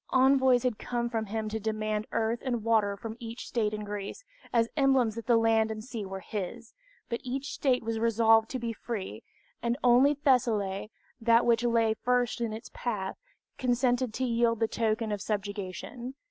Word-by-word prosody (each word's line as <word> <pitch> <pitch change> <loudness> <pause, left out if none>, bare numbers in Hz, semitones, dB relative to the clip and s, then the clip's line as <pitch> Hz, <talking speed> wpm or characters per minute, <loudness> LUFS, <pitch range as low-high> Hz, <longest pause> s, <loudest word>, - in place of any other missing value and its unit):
Envoys 260 -1 +4
had 250 -4 -1
come 240 -1 -2
from 220 -2 -2
him 220 +1 -3
to 220 +1 -3
demand 215 0 -2
earth 225 +1 0
and 240 -4 -2
water 215 -3 +2
from 220 +2 -6
each 230 0 -7
state 215 -3 0
in 210 0 -4
Greece, 205 - -6 0.3
as 230 -1 +3
emblems 270 -6 +3
that 230 +1 -7
land 225 -1 +4
and 215 -1 -5
sea 230 -5 -6
were 190 0 -6
his, 215 +4 -6 0.3
but 235 - -3
each 265 +2 -4
state 255 -4 +1
was 225 0 -2
resolved 225 -1 +4
to 260 - -3
be 235 -2 -3
free, 200 - -5 0.4
and 235 +1 0
only 255 +4 +5
Thessaly, 225 -8 +1 0.3
that 230 0 +4
which 235 0 +3
lay 230 -2 +3
first 245 +1 0
in 230 -2 -1
his 220 +2 -7
path, 205 -6 -4 0.4
consented 245 -1 +1
to 260 - -1
yield 230 -2 +2
the 225 - +2
token 220 -1 -1
of 205 -1 -2
subjugation. 205 +5 -4
230 Hz, 175 wpm, -29 LUFS, 215-245 Hz, 0.4 s, only